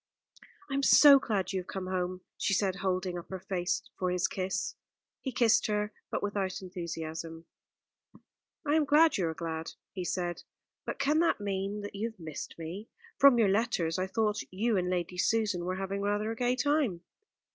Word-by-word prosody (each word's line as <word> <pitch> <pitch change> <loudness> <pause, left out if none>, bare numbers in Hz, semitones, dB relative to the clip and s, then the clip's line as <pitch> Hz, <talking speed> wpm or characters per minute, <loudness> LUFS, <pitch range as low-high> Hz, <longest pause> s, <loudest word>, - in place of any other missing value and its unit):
"I 275 - -6
am 275 - +1
so 280 0 +8
glad 205 -6 -1
you 190 - 0
have 180 - -8
come 190 -1 -4
home," 185 0 -2
she 195 - +1
said, 190 -1 0
holding 185 -2 -1
up 170 - -12
her 190 - -5
face 180 -1 -2 0.2
for 185 - 0
his 180 0 +1
kiss. 190 +1 -2 0.5
He 265 - -3
kissed 230 -2 +3
her, 210 0 -1 0.2
but - - -2
without 200 -2 -1
enthusiasm. 165 -3 -6 1.2
"I 290 - +1
am 315 0 +4
glad 305 -2 +5
you 175 - +1
are 160 - -3
glad," 160 -1 -4 0.2
he 185 - -4
said, 175 -1 -2 0.5
"but - - -3
can 290 +3 +2
that 335 -7 +2
mean 200 0 -2
that 205 - -7
you 215 +3 -2
have 220 -3 -19
missed 160 -3 -7
me? 170 +7 -7 0.3
From 275 -3 +8
your 220 -4 +4
letters 190 -5 +1
I 185 - 0
thought 215 +1 0
you 220 +4 0
and 180 -1 0
Lady 180 0 -2
Susan 205 -5 +1
were 185 +1 -1
having 195 +1 -3
rather 205 +2 0
a - - -4
gay 245 +2 +1
time." 260 - +1
195 Hz, 190 wpm, -30 LUFS, 180-225 Hz, 1.2 s, so